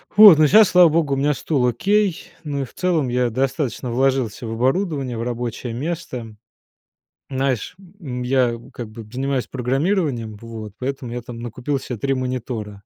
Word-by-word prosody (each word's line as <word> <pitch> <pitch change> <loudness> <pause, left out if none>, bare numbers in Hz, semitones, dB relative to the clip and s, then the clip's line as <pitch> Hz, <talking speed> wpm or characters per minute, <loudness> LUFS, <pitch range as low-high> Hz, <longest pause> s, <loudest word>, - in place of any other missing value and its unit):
Вот, 205 -6 +10
но 155 -1 +5
сейчас, 215 +4 +7
слава 180 -2 +7
богу, 155 -3 +1
у - - 0
меня 145 +2 +2
стул 130 -4 0
окей. 200 - +1 0.2
Ну 140 -2 -3
и - - -2
в - - -17
целом 170 -7 0
я 125 0 +1
достаточно 130 0 -2
вложился 130 -3 0
в - - -4
оборудование, 135 - 0
в 115 - -3
рабочее 120 -1 -4
место. 125 -6 -5 0.9
Знаешь, 130 - -1 0.2
м, 125 -7 -5
я 125 -2 +2 0.2
как 115 -3 -7
бы 110 +1 -9
занимаюсь 135 0 -1
программированием, 135 - -1
вот, 110 -3 -8
поэтому 130 -2 -4
я 120 0 -4
там 115 0 -9
накупил 120 +4 -3
себе 125 -2 -6
3 135 0 0
монитора. 125 -5 -3
130 Hz, 170 wpm, -21 LUFS, 120-145 Hz, 0.9 s, Вот